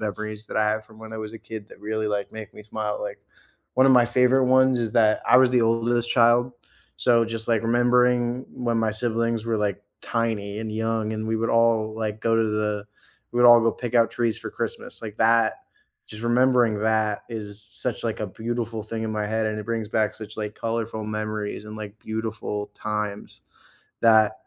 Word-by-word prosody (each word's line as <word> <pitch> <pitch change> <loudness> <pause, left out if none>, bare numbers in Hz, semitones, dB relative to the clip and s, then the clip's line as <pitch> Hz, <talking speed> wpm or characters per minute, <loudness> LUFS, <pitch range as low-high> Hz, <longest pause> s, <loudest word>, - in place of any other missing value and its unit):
memories 110 0 -5
that - - -3
I 105 0 +3
have 110 0 -1
from 110 0 -18
when 110 0 -10
I - - -5
was 110 0 -6
a 115 - -9
kid, 110 -2 -9
that - - -16
really 110 0 -2
like 105 -1 -3
make 110 -1 -9
me - - -12
smile. 105 -1 -3
Like 105 - -6 0.5
one 130 +1 +5
of 135 - +6
my 125 -1 +6
favorite 125 +2 +3
ones 130 -1 +4
is 115 -2 0
that 110 -3 +3
I - - +7
was 130 -1 +6
the 125 -2 +3
oldest 115 +1 +1
child, 120 +1 +4 0.5
so, 120 -2 +4
just, 115 0 0
like, 115 -2 +2
remembering 120 +1 +2
when 120 -2 -2
my 110 -1 +1
siblings 115 0 0
were, 115 -1 -1
like, 105 -1 -2 0.2
tiny 110 -3 -2
and 110 -1 -5
young, 110 0 -1
and 110 0 -4
we 110 - 0
would 115 +1 -1
all, 115 -2 +2
like, 110 -1 -4
go 115 0 +2
to 115 -1 +2
the 105 -1 -2 0.5
we - - -6
would - - +8
all 120 0 +9
go 115 0 +3
pick 120 +1 -6
out 115 -1 +4
trees 115 -2 0
for - - -6
Christmas, - - -3
like, 110 -1 -8
that 115 0 +4 0.5
just 110 +1 -5
remembering 120 -2 +3
that, 110 -1 0
is 105 -3 -4
such, 110 +3 0
like, 115 -2 -3
a 110 - -1
beautiful 115 +2 -4
thing 110 +1 -5
in 110 -1 -3
my 105 -1 -2
head, 110 +1 -1
and 110 0 -2
it 105 - -7
brings 115 -2 -3
back 110 -1 +1
such, 110 0 -7
like, 105 -1 -4
colorful 115 -1 -3
memories 110 -1 -4
and, 105 0 -8
like, 110 0 -8
beautiful 110 -2 -4
times 105 -1 -5 0.6
that 110 -2 +5
110 Hz, 210 wpm, -24 LUFS, 110-115 Hz, 0.6 s, all